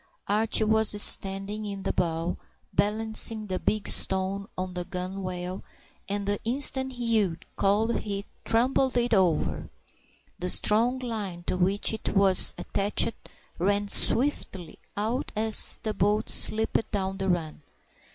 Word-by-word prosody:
Archie 215 +2 +1
was 220 -1 +3
standing 195 +2 +4
in 200 -2 -6
the - - -2
bow, 170 0 -2 0.4
balancing 220 +1 0
the 185 -2 -4
big 215 -1 -2
stone 190 +1 0
on 185 0 -5
the 180 0 -4
gunwale, 185 0 -6 0.5
and 200 0 -3
the 205 0 -1
instant 265 +2 +1
Hugh 225 -8 0 0.2
called 210 +4 +1
he 200 -1 -5 0.2
tumbled 250 +3 +1
it 240 -1 0
over. 160 - 0 0.7
The 180 - -2
strong 230 +7 +3
line 210 -8 -6
to - - -3
which 190 +4 0
it 220 - -4
was 195 -2 +5
attached 205 +3 0 0.5
ran 200 +3 0
swiftly 200 - +3 0.2
out 225 +6 -3
as 220 0 +3
the 215 - -2
boat 210 +2 0
slipped 220 +1 +1
down 195 -2 -3
the 195 0 -2
run. 160 -4 -3
205 Hz, 130 wpm, -26 LUFS, 185-220 Hz, 0.7 s, was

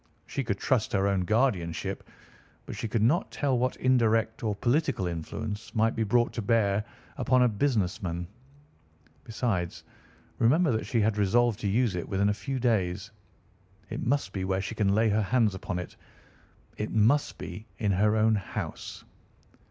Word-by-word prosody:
She 140 - -3
could 100 -4 -2
trust 125 -1 0
her 95 -1 +2
own 95 -2 +1
guardianship, 100 -7 0 0.6
but - - -7
she - - -3
could 110 0 0
not 155 - +2
tell 140 -3 0
what 130 +1 0
indirect 115 -3 +2
or 105 -3 -1
political 130 - +1
influence 95 +6 -5
might 115 +1 +2
be 115 - -1
brought 120 +3 +2
to 115 - -3
bear 105 -2 +2 0.3
upon 125 0 +3
a - - +5
business 105 -3 0
man. 85 -2 -3 1.0
Besides, 105 -6 -2 0.6
remember 150 +7 +4
that 110 -1 -1
she 115 - +1
had 105 0 +1
resolved 115 +2 +2
to 105 - -2
use 115 +2 +2
it 85 - -4
within 100 +1 +2
a - - +2
few 105 +7 -4
days. 105 -4 0 0.8
It - - -3
must 125 -7 0
be 95 - -2
where 95 0 0
she 95 - -4
can 100 -2 +1
lay 110 +1 +3
her 105 +1 +2
hands 110 0 +2
upon 95 -1 -4
it. 90 - -6 0.8
It 105 - -3
must 115 +7 +2
be 110 - -8
in 105 -3 0
her 105 +3 +3
own 110 0 +4
house." 100 -2 -5
110 Hz, 170 wpm, -28 LUFS, 100-120 Hz, 1.0 s, a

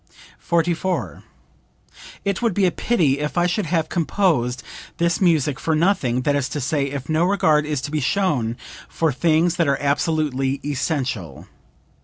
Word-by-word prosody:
44. 170 - -1 1.0
"It 200 +1 -1
would 230 -6 +1
be 200 - +3
a 180 - +3
pity 160 - +1
if 150 0 -3
I 175 - +3
should 180 +1 -1
have 165 -1 0
composed 155 - 0 0.3
this 170 +1 +1
music 155 -6 +2
for 160 - 0
nothing, 155 -8 +1
that 145 +1 +1
is 140 -1 -1
to 150 - -3
say 140 +1 0
if 140 -1 -6
no 155 +1 +1
regard 155 -6 +2
is 150 -3 -2
to 145 - -5
be 155 - 0
shown 130 - 0 0.3
for 160 -2 0
things 165 +4 +2
that 170 - +2
are 140 -1 +2
absolutely 140 -2 0
essential. 130 - -3
155 Hz, 160 wpm, -21 LUFS, 135-170 Hz, 1.0 s, be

